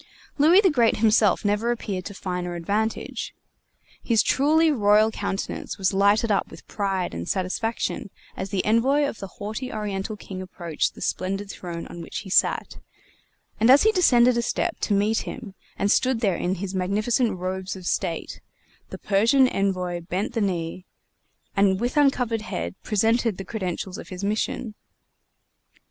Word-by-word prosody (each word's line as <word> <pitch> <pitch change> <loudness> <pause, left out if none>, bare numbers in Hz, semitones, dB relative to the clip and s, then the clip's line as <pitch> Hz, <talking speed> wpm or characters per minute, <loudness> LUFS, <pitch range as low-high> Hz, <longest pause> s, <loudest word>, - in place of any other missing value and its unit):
Louis 335 +7 +7
the 380 -4 +4
Great 240 -5 +3
himself 215 -2 +3
never 210 +3 +1
appeared 205 -6 -3
to 200 - -7
finer 180 -2 -4
advantage. 205 +6 -2 0.7
His 225 -3 +3
truly 310 +4 +3
royal 215 -3 +4
countenance 195 -2 -4
was 190 -1 +1
lighted 205 +3 +3
up 200 - +1
with - - -14
pride 195 -3 -2
and 85 +1 -5
satisfaction 200 +3 -2 0.3
as 190 - -5
the 185 -1 -1
Envoy 255 +7 +3
of 225 - -6
the 195 - -6
haughty 215 +5 -5
Oriental 210 0 -4
king 190 -2 -8
approached 175 -4 -3
the - - -12
splendid 195 +2 -2
throne 170 -2 -6
on 175 - -9
which 165 - -6
he 190 - -10
sat, - - +2 0.8
and 225 +3 +4
as 270 +2 +8
he 440 - +5
descended 250 - +4
a - - +2
step 335 +8 -2
to 205 - 0
meet 210 +3 +2
him 230 -7 -7 0.2
and 200 - +1
stood 255 -2 +2
there 195 -6 +2
in 180 +2 -1
his 190 +1 -5
magnificent 210 +5 0
robes 185 +1 -4
of 185 -2 -10
state, 175 -2 -2 0.5
the - - -7
Persian 230 +7 +3
envoy 185 -4 -1
bent 185 +4 -3
the 230 - -1
knee, 180 -2 -2 0.7
and 195 -1 +3
with 245 +5 -2
uncovered 250 -6 +2
head 85 - -4
presented 225 0 +1
the 195 - -6
credentials 190 -3 -4
of - - -10
his 185 +1 -7
mission. 215 +2 -2
205 Hz, 160 wpm, -24 LUFS, 185-230 Hz, 0.8 s, as